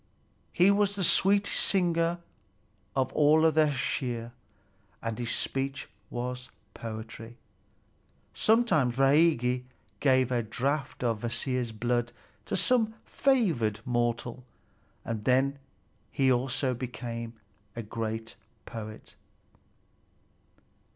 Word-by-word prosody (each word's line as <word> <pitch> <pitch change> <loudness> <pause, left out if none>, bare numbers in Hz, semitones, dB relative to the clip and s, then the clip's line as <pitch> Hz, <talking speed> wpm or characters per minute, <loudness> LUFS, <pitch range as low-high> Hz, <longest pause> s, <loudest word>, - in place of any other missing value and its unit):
He 180 +3 +5
was 200 0 +2
the 195 - -2
sweetest 200 +3 +3
singer 170 -2 +2 0.8
of 130 -1 0
all 150 +1 +5
the 155 0 +4
Æsir, 125 -4 -2 0.7
and 115 0 -4
his 120 -1 -3
speech 135 +2 -2 0.2
was 125 +1 -5 0.2
poetry. 115 +1 -8 1.0
Sometimes 215 - +3
Bragi 135 -3 +3 0.4
gave 130 -2 +3
a 120 -1 +2
draught 135 +5 -2
of 115 -3 0
Kvasir's 120 +1 -2
blood 120 +2 -1 0.3
to - - -1
some 225 0 +2
favored 170 - +1
mortal, 120 0 -1 0.6
and 110 -2 -3
then 135 +2 +2 0.5
he 135 -1 +3
also 130 +1 0
became 120 -1 -5 0.4
a 115 - -4
great 110 +1 -4 0.3
poet. 110 -2 -8
125 Hz, 95 wpm, -29 LUFS, 115-155 Hz, 1.0 s, He